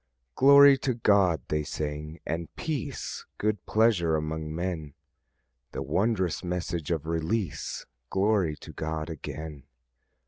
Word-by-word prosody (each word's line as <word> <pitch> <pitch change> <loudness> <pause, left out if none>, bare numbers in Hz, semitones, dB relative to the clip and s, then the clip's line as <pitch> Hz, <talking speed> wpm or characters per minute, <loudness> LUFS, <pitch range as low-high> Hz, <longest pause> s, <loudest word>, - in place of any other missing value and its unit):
"Glory 140 - +8
to 130 -3 0
God," 100 - +3
they 75 0 +1
sang; 75 +1 -5
"and 85 +1 -3
peace, 150 - -4
Good 105 -2 -1
pleasure 105 -8 +3
among 80 0 -3
men." 85 -5 -3 0.8
The - - -3
wondrous 95 -4 0
message 85 -3 -3
of 80 -3 -1
release! 85 +2 -2 0.2
Glory 95 -5 +2
to - - -11
God 80 0 -3
again! 75 -1 -7
85 Hz, 115 wpm, -28 LUFS, 80-105 Hz, 0.8 s, Glory